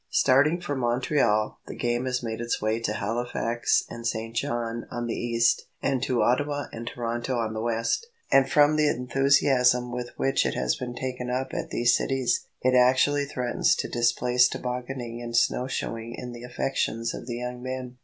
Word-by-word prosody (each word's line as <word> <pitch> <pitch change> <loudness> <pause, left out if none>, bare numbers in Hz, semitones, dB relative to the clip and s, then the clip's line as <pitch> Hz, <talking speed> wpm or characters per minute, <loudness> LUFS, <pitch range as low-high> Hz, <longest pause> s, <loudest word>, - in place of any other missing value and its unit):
Starting 145 +6 +4
from 145 -6 -3
Montreal, 120 -3 +1
the - - -7
game 120 +1 -1
has 125 -1 -1
made 115 0 -4
its 120 0 -1
way 110 +1 0
to 105 -2 -2
Halifax 115 +2 0
and 115 0 -5
St. 115 0 -3
John 115 0 -2
on 120 0 -4
the 115 - -2
east, 115 -1 +1
and 135 -3 0
to 125 -3 +1
Ottawa 145 +5 +1
and 115 +1 -7
Toronto 120 +1 -3
on 110 -2 -1
the 110 - -3
west, 115 - -1 0.2
and 135 -1 +5
from 150 +1 +4
the 155 -1 +4
enthusiasm 125 -1 +3
with 120 0 -4
which 135 - +2
it - - -1
has - - +1
been 120 -1 -6
taken 125 -1 -4
up 130 +1 -2
at - - -3
these 120 +1 +3
cities, 135 -2 0 0.2
it 130 0 +3
actually 130 +3 +4
threatens 125 -3 +1
to - - -3
displace 125 +1 +3
tobogganing 125 -1 -5
and 120 -1 -2
snow 125 +1 +2
shoeing 115 -2 -4
in 125 -1 -6
the 120 -1 -9
affections 120 -2 -2
of - - -8
the 120 - -3
young 125 0 -5
men. 130 -1 -5
125 Hz, 185 wpm, -26 LUFS, 115-130 Hz, 0.2 s, and